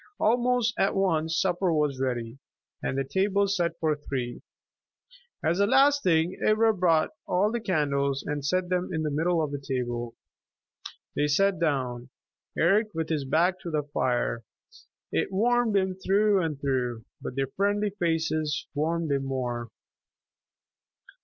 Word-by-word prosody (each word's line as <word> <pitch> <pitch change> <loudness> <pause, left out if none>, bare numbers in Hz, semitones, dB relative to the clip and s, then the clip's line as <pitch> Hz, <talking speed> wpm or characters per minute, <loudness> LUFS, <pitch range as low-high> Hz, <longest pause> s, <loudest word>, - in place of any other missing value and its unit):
Almost 245 0 +2
at 195 - +2
once 165 -4 +1
supper 180 -1 +1
was 150 -4 0
ready, 120 -1 -3 0.4
and 135 - -2
the 135 - +1
table 200 +7 +1
set 170 -4 -1
for 155 -3 +1
three. 130 -4 -5 1.0
As 170 +4 +1
the 200 - +4
last 275 +4 +4
thing, 170 - +1
Ivra 220 +1 +4
brought 165 -4 +2 0.2
all 200 +4 +2
the 235 - -1
candles 140 -8 0
and 145 -1 -3
set 180 +5 0
them 180 0 0
in 160 -2 -1
the 150 - -1
middle 165 +3 +1
of 150 - -3
the 145 - -3
table. 120 -3 -3 1.0
They 150 - +1
sat 195 +6 +2
down, 130 -6 -1 0.5
Eric 200 +6 +3
with 160 -1 -2
his 150 -4 -1
back 175 +7 +2
to 170 - -6
the 155 -2 -1
fire. 120 -2 0 0.7
It - - 0
warmed 230 +2 +2
him 190 -1 +1
through 195 +2 +2
and 155 -4 -3
through, 125 -4 -2 0.2
but 125 - -6
their 135 -1 -1
friendly 205 +1 +1
faces 160 -5 -1
warmed 160 +1 -1
him 135 -1 0
more. 120 -3 -3
160 Hz, 150 wpm, -27 LUFS, 140-195 Hz, 1.0 s, the